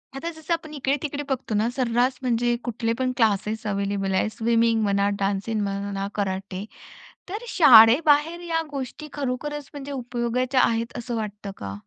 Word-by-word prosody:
आता 330 +5 -4
जसं 320 +1 -3
आपण 320 -2 -4
इकडे-तिकडे 285 +1 -2
बघतो 260 -4 -2
ना, 215 +3 +2
सर्रास 250 0 +1
म्हणजे 240 -1 +1
कुठले 230 -1 -1
पण 255 0 +1 0.5
अवेलेबल 200 -1 -1
आहे. 190 +3 +1
स्विमिंग 230 0 +2
म्हणा, 200 0 +2
डान्सिंग 200 +2 -1
म्हणा, 200 0 -3
कराटे. 195 -1 -3 0.6
तर 420 +5 -5
शाळेबाहेर 295 - +6
या 325 -1 +1
गोष्टी 280 +2 -6
खरोखरच 290 +1 -4
म्हणजे 285 -1 -7
उपयोगाच्या 250 0 0
आहेत, 230 +1 0
असं 240 0 -4
वाटतं 210 -2 -5
का? 100 -1 -6
240 Hz, 140 wpm, -24 LUFS, 205-280 Hz, 0.6 s, शाळेबाहेर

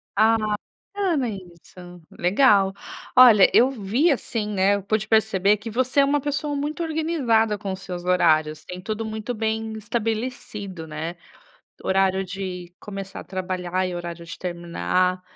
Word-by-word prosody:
Ah, 225 +1 +5 0.4
bacana 350 - -2
isso, 180 -2 -11
legal. 195 0 +3 0.4
Olha, 235 -6 +8
eu 250 - +6
vi 255 - +1
assim, 225 -4 -2
né, 200 0 +2
eu 200 - -5
pude 215 +2 -1
perceber 210 -2 +3
que 215 +3 -8
você 255 +4 +1
é - - +6
uma 285 +1 +2
pessoa 290 +1 -2
muito 295 +4 -3
organizada 270 -10 +1
com 195 -1 -4
os 190 - -6
seus 180 -1 -6
horários, 155 -4 +2
tem 180 0 -8
tudo 215 +3 -4
muito 220 +2 -4
bem 220 0 -2
estabelecido, 215 -5 -4
né. 160 +3 -5 0.7
Horário 190 0 +2
de 180 -2 -6
começar 195 -2 -7
a - - -11
trabalhar 185 -1 -2
e 180 - -4
horário 170 -1 -6
de 170 - -8
terminar, 180 - -1
200 Hz, 150 wpm, -23 LUFS, 180-230 Hz, 0.7 s, Olha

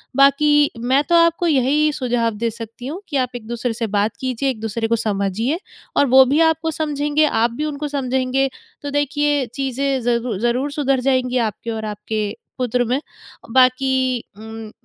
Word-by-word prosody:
बाकी 290 +2 +4
मैं 260 +4 +2
तो 345 - +4
आपको 335 +1 +3
यही 295 +1 +3
सुझाव 245 -5 0
दे 230 +2 -1
सकती 230 +2 -8
हूँ 335 +7 -5
कि 285 - -1
आप 255 -1 -1
एक-दूसरे 235 +1 -3
से 230 0 -3
बात 205 +1 0
कीजिए 260 +1 -1
एक-दूसरे 225 -1 -2
को 230 - +2
समझिए 215 - -1 0.4
और - - +5
वो 265 +1 +7
भी 280 +4 +2
आपको 320 0 +2
समझेंगे, 295 0 0
आप 230 -4 +1
भी 295 +6 -3
उनको 295 0 -3
समझेंगे, 265 -1 0 0.3
तो 285 - -5
देखिए 290 0 +1
चीज़ें 270 0 -1
ज़रू 235 -3 0
ज़रूर 245 +5 0
सुधर 275 -3 +1
जाएँगी 255 -1 +1
आपकी 230 0 -2
और 220 -1 -3
आपके 210 0 -3 0.2
पुत्र 250 0 +1
में। 255 +4 0 0.5
बाकी 260 0 +3 0.2
उम, 220 0 -9
255 Hz, 165 wpm, -20 LUFS, 230-285 Hz, 0.5 s, वो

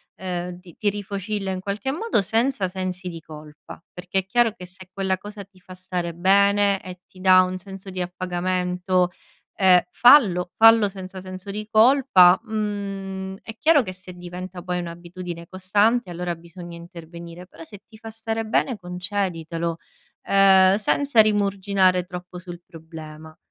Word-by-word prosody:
ehm, 180 -1 -5
ti 175 -3 -16
ti 210 - +1
rifocilla 200 0 -4
in 185 - -3
qualche 200 +7 -3
modo, 350 - 0
senza 225 +1 0
sensi 185 0 -5
di 165 -1 -8
colpa; 155 +1 -13
perché 180 +2 -2
è 190 - -5
chiaro 235 +2 +2
che 180 - -11
se 185 +1 -13
quella 190 -1 -1
cosa 205 +1 -9
ti 195 -1 -25
fa 185 0 -13
stare 180 -2 -4
bene 200 +2 +3
e 185 -1 -10
ti 185 - -18
dà 185 0 +7
un 185 0 -2
senso 195 +1 -10
di 185 -1 -5
appagamento, 180 0 -1 0.5
ehm, 185 -2 +6
fallo 195 -8 +5
fallo 225 -1 +7
senza 190 -1 -9
senso 185 +1 -8
di 210 +1 -6
colpa. 215 -6 +6
Mhmm, 195 -3 -4
è 225 0 -9
chiaro 305 -1 +4
che 185 - -6
se 185 0 -11
diventa 180 +1 -8
poi 180 -1 -2
un'abitudine 175 0 -8
costante, 205 +5 +1
allora 175 0 -3
bisogna 170 +1 -11
intervenire, 170 0 -11
però 165 -3 -13
se 200 +5 -10
ti 220 - -17
fa 225 0 -10
stare 225 0 -4
bene 230 +2 0
conceditelo, 175 -3 -3 0.5
ehm, 190 -1 +5
senza 230 +4 +3
rimuginare 200 -3 +2
troppo 180 0 -9
sul 175 -1 -10
problema. 160 -1 -12
185 Hz, 155 wpm, -23 LUFS, 180-205 Hz, 0.5 s, dà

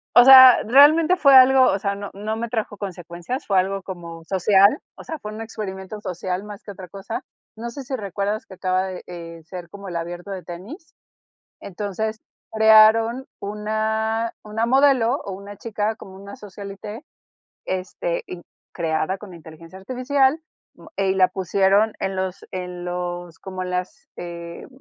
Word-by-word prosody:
O 245 - +10
sea, 260 -1 +10
realmente 300 +8 +6
fue 280 -6 +6
algo, 260 0 +8
o 195 - 0
sea, 200 0 -1
no 200 0 -7
no 210 +2 -4
me 230 +1 -4
trajo 215 -2 -3
consecuencias, 180 +4 -6
fue 195 -2 +3
algo 195 +1 -2
como 170 -3 -8
social, 195 - +4 0.2
o - - -12
sea, 320 -2 -6
fue 210 -4 -7
un 215 +1 -7
experimento 210 -2 -7
social 180 0 -4
más 210 -1 -10
que 205 - -8
otra 190 -2 -10
cosa. 195 +5 -6 0.3
No 230 +2 -6
sé 270 +4 -8
si 265 +1 -4
recuerdas 205 -1 -3
que 190 - -11
acaba 185 0 0
de, 185 -1 -7
eh, 170 -1 -9
ser 175 +1 -9
como 200 +1 -10
el 175 - -6
abierto 175 +3 -5
de 190 -2 -6
tenis. 210 - -10 0.7
Entonces, 210 +3 -4 0.3
crearon 220 +3 +5
una 220 +2 -2
una 220 +2 -2
modelo 265 -1 +4
o 200 - -5
una 200 +2 -9
chica, 215 0 -3
como 190 - -12
una 200 +3 -10
socialité, 205 +1 -9 0.6
este, - - -3
in - - -8 0.3
creada 165 +2 -1
con 195 -3 -11
inteligencia 165 +2 -13
artificial, 265 +6 +1 0.4
mo 320 - -16
eh, 195 -1 +1
y - - +1
la 185 -1 +4
pusieron 195 +3 +2
en 190 0 -2
los 185 -1 -4
en 180 -1 -6
los 175 -1 -5
como 185 -1 -6
en 180 - -5
las 180 0 -5
eh, 170 -1 -8
200 Hz, 170 wpm, -22 LUFS, 185-225 Hz, 0.7 s, O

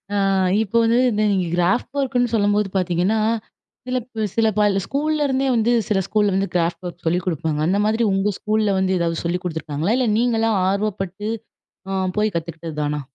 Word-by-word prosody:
ஆ - - +1 0.5
இப்போ 220 +2 -1
வந்து 230 +1 +3
இந்த 215 0 0
நீங்க 185 -3 0
கிராஃப்ட் 190 +9 0
ஒர்க்குன்னு 250 -3 0
சொல்லும்போது 205 -1 +2
பார்த்தீங்கன்னா, 185 +4 +1 0.7
சில 255 0 0
ப் 230 -3 -6
சில 225 -1 +3
பல 205 -2 +3
ஸ்கூல்லேருந்தே 285 -2 0
வந்து 230 +1 +2 0.2
சில 200 -3 +1
ஸ்கூல்ல 210 -2 +1
வந்து 195 +1 0
கிராஃப்ட் 170 +1 0
ஒர்க் 175 - -10
சொல்லிக் 175 +2 0
குடுப்பாங்க. 160 -3 -1
அந்த 195 +3 +2
மாதிரி 220 +2 +1
உங்க 195 +2 +1
ஸ்கூல்ல 215 -2 +1
வந்து 190 0 +1
எதாவது 165 -1 -1
சொல்லி 170 +2 -1
குடுத்துருக்காங்களா? 160 +2 -2
இல்ல 255 -3 +1
நீங்களா 225 -1 +2 0.2
ஆர்வப்பட்டு 200 0 -2 0.6
ஆ 190 -1 0 0.2
போய் 215 -3 +1
கத்துக்கிட்டது 165 -1 -5
தானா? 150 0 -1
205 Hz, 170 wpm, -21 LUFS, 175-225 Hz, 0.7 s, வந்து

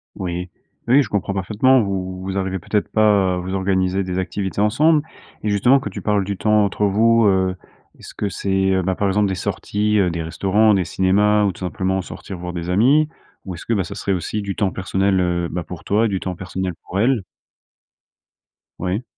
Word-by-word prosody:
Oui. 90 0 -4 0.4
Oui, 135 +4 +5
je - - -8
comprends 100 -1 -1
parfaitement. 110 +7 +3
Vous 95 -2 -3
vous 95 +1 -4
arrivez 95 0 -2
peut-être 105 +4 -1
pas 100 -4 +3
à - - -3
vous 90 +1 -4
organiser 95 0 0
des 90 -1 -4
activités 95 +1 -3
ensemble 150 +9 +3 0.4
et 105 - 0
justement, 120 +7 +4
quand 135 - -5
tu - - -7
parles 105 -2 +1
du 100 0 -4
temps 105 +3 +3
entre 100 +1 -1
vous, 115 +3 +4
heu, 95 -1 +2 0.4
est-ce - - -11
que 105 - -2
c'est, 95 0 0
heu, 95 0 +2
bah, 95 +1 -1
par 100 - 0
exemple 100 +1 +2
des 95 - -1
sorties, 105 +4 -1
heu, 95 -2 +3
des 85 -1 -3
restaurants, 100 +6 +2
des 95 -2 +2
cinémas 100 +4 +2
ou 100 - +1
tout - - -14
simplement 95 +1 -1
sortir 95 +1 -8
voir 90 0 -5
des 85 0 -5
amis? 130 +11 +4 0.4
Ou 95 -2 -5
est-ce 85 - -10
que, 115 - 0
bah, 100 -3 +1
ça 100 +4 -8
serait 100 - -3
aussi 95 +4 -3
du 100 -2 -4
temps 100 -2 0
personnel, 95 0 0
heu, 85 -1 0
ben, 90 +1 -3
pour 90 -1 -9
toi 105 +3 +2
et - - +3
du 95 -2 -1
temps 90 0 -4
personnel 95 +1 -4
pour 95 - -2
elle? 120 -1 +2 1.6
Oui. 95 +6 -2
95 Hz, 215 wpm, -20 LUFS, 95-105 Hz, 1.6 s, Oui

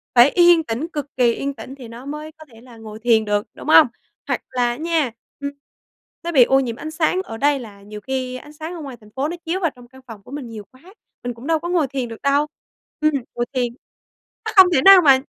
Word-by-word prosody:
phải 245 +3 +8
yên 345 0 +5
tĩnh, 250 +3 -3
cực 290 -1 -5
kỳ 240 -2 +4
yên 280 +3 -3
tĩnh 260 +2 -10
thì 255 -4 -11
nó 235 +3 -11
mới 300 +2 -6
có 315 0 -16
thể 225 0 -16
là 240 -2 -15
ngồi 220 -1 -10
thiền 225 -1 +3
được, 205 0 -1
đúng - - -11
hông? 310 -1 +8 0.4
Hoặc - - -1
là 250 -1 0
á 240 - -2
nha, 320 -4 0 0.3
ừm, 280 0 -4 0.7
nó 340 - -3
bị 270 -7 +7
ô 270 +3 +3
nhiễm 240 -4 -2
ánh 310 +6 -7
sáng 330 +3 +1
ở 225 -12 -8
đây 285 +3 +2
là 210 -5 -11
nhiều 210 +1 -10
khi 255 +1 -3
ánh 295 +4 -13
sáng 315 +3 -7
ở 340 - -7
ngoài 270 -4 -8
thành 210 - -17
phố 270 +2 -1
nó 345 - -4
chiếu 340 +3 -1
vào 335 -5 0
trong 245 -1 -15
căn 260 +2 -17
phòng 215 -4 -11
của - - -15
mình 280 -3 -6
nhiều 220 -2 -8
quá, 255 - -21 0.4
mình 245 0 -3
cũng 235 +4 -11
đâu 325 -1 +2
có 345 +2 -5
ngồi 340 -5 +2
thiền 265 -2 -3
được 225 - -10
đâu. 285 +2 +2 0.5
Ừm, 310 0 +4 0.2
ngồi 240 - -1
thiền 245 -2 -1 0.7
nó - - -2
không 380 -2 +9
thể 265 - +4
nào 390 -1 +10
mà 275 -5 +6
265 Hz, 260 wpm, -21 LUFS, 240-310 Hz, 0.7 s, nào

